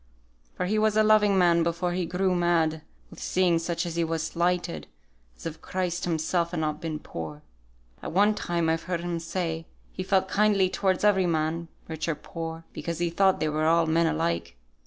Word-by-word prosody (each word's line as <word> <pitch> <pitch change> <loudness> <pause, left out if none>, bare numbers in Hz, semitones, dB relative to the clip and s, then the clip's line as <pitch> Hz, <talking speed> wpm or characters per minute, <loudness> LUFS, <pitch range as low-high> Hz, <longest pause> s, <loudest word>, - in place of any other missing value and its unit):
For - - -2
he 215 +4 +1
was 215 0 +2
a 215 - +6
loving 210 -2 +4
man 170 -2 +4
before 170 +1 0
he 175 -1 -1
grew 185 +2 +1
mad 165 -3 +1 0.3
with - - -11
seeing 180 -2 +2
such 170 +1 -2
as 170 -1 -4
he 170 - +2
was 165 -1 -1
slighted, 170 - -1 0.5
as - - -13
if 160 -1 -5
Christ 180 -1 -2
Himself 170 +1 0
had 170 -1 -3
not 155 0 -2
been 160 -2 -3
poor. 80 - -7 0.6
At - - -5
one 205 +4 +4
time, 170 -4 -1
I've 160 0 +1
heard 175 -2 -1
him 175 -1 -2
say, 165 -1 -3 0.3
he - - -4
felt 190 0 +2
kindly 200 -2 +3
towards 190 -1 0
every 190 -3 +4
man, 165 +1 -1 0.2
rich 160 0 -4
or 165 - 0
poor, 165 +1 -7
because 170 -1 -4
he 170 0 -1
thought 190 +2 +3
they - - 0
were 155 +1 0
all 165 0 +4
men 165 +1 +2
alike. 85 - -1
170 Hz, 200 wpm, -27 LUFS, 160-185 Hz, 0.6 s, a